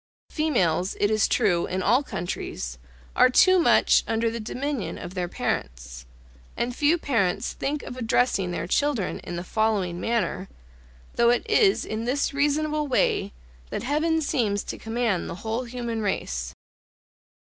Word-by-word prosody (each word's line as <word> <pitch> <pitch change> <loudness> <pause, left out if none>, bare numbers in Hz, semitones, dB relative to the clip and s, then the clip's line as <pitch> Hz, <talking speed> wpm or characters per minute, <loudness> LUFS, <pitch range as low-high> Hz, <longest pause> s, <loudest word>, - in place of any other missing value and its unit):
Females, 190 - +1
it 205 - +2
is 215 -1 +3
true, 170 -2 +2
in 185 0 -2
all 245 +8 +4
countries, 120 - -5 0.4
are - - +6
too 370 +8 +5
much 335 - +4
under 225 0 0
the 230 - -4
dominion 255 +2 -3
of 180 - -8
their 180 -2 -2
parents; - - -4 0.5
and 240 0 -2
few 300 +5 +3
parents 225 - 0
think 285 +1 -3
of - - -7
addressing 230 -5 +1
their 175 -1 -3
children 250 +1 0
in 175 - -7
the 170 - -4
following 200 -4 0
manner, 225 -4 -1 0.7
though 235 0 +5
it 240 - +1
is 395 -3 +3
in 220 +1 -4
this 275 +4 0
reasonable 300 +1 0
way 260 - +1 0.4
that - - -4
Heaven 320 +4 +1
seems 210 -8 0
to - - -6
command 225 -4 -1
the - - -5
whole 225 +3 -2
human 235 -2 -4
race. 65 - -3
230 Hz, 150 wpm, -25 LUFS, 185-280 Hz, 0.7 s, are